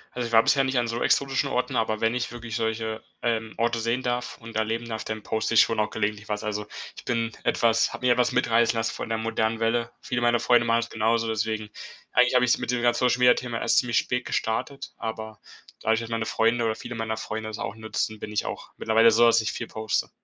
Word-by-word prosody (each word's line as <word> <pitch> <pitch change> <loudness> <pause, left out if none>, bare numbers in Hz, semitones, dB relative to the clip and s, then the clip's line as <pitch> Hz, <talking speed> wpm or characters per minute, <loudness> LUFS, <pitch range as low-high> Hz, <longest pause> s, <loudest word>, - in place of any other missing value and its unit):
Also, 120 -1 -2
ich - - -9
war 115 0 +6
bisher 135 -1 +3
nicht 130 -1 -1
an 120 -1 +1
so 115 +1 -3
exotischen 135 0 +2
Orten, 125 -1 -1
aber 110 -1 0
wenn 115 +1 +1
ich 125 -1 -2
wirklich 120 -1 -7
solche, 110 -1 -2 0.2
ähm, 110 -2 -1
Orte 115 0 +1
sehen 115 +3 -1
darf 125 0 -2
und 115 -1 -11
erleben 110 +2 -1
darf, 110 -1 -4
dann 110 -1 -5
poste 110 +1 -1
ich - - +9
schon 115 -1 +1
auch 105 - +1
gelegentlich 105 +1 -3
was. 105 +1 -2
Also 105 -1 -3 0.3
ich - - -11
bin 115 -1 -1
etwas 115 -1 +2
habe 125 - -5
mir 125 - +5
etwas 125 0 +1
mitreißen 115 0 +2
lassen 110 0 -1
von - - -6
der 115 - 0
modernen 110 0 -1
Welle. 115 +1 0
Viele 120 -1 -2
meiner 120 0 +3
Freunde 120 -1 +4
machen 115 0 +3
das 115 - -6
genauso, 115 +1 +1
deswegen 110 -1 -2 0.4
eigentlich 125 +1 +4
habe 125 - +5
ich's 120 - +2
mit - - -4
diesem 120 -1 0
ganzen 120 - +3
Social-Media-Thema 125 -1 +3
erst - - +3
ziemlich 120 -2 0
spät 125 0 0
gestartet, 135 +5 -3
aber 110 -1 -6 0.4
dadurch, 110 +1 +1
dass 115 - -7
meine 115 -1 -1
Freunde 115 +1 +2
oder 110 - 0
viele 120 - -8
meiner 110 -1 -3
Freunde 110 0 -5
das 110 - -6
auch - - -4
nutzen, 110 -1 -3
bin 105 - -7
ich 105 - -1
auch - - -6
mittlerweile 115 +1 +4
so, 115 +2 +5
dass 115 -1 +5
ich 110 - -2
viel - - -5
poste. 110 -1 -2
115 Hz, 235 wpm, -25 LUFS, 110-120 Hz, 0.4 s, ich